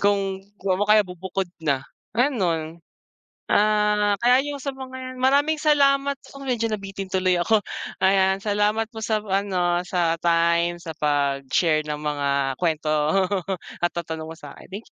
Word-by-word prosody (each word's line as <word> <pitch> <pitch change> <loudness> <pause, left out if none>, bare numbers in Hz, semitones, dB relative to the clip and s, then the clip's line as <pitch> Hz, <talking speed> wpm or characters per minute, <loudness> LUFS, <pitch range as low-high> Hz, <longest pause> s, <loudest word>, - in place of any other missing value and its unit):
Kung 195 -1 +1 0.2
o 195 +2 +1
kaya 210 -1 +6
bubukod 185 +1 -4 0.2
na, 135 -3 0 0.3
ganon. 170 - 0 0.7
Ah, 210 -1 +3
kaya 250 +2 +5
yung 290 - -3
sa 275 - -3
mga 260 -1 -8
maraming 290 +4 +3
salamat 280 -2 +3
sa'yo. 275 0 -11
Medyo 230 -3 0
nabitin 195 -2 -5
tuloy 185 -1 +2
ako, 210 +5 +3 0.4
ayan. 190 0 +3
Salamat 210 +2 +1
po 220 -2 -9
sa 215 0 +1
ano, 190 -3 0
sa 175 -2 0
time 170 +1 +2
sa 160 -2 -8
pag-share 145 +2 +1
ng 150 0 -4
mga 145 -2 -1 0.3
kwento 160 -3 -1
at 180 +3 0
lahat - - -64
ng 170 - -4
tanong 160 -1 -5
mo - - -12
sakin. 185 +7 -10
190 Hz, 145 wpm, -23 LUFS, 170-220 Hz, 0.7 s, kaya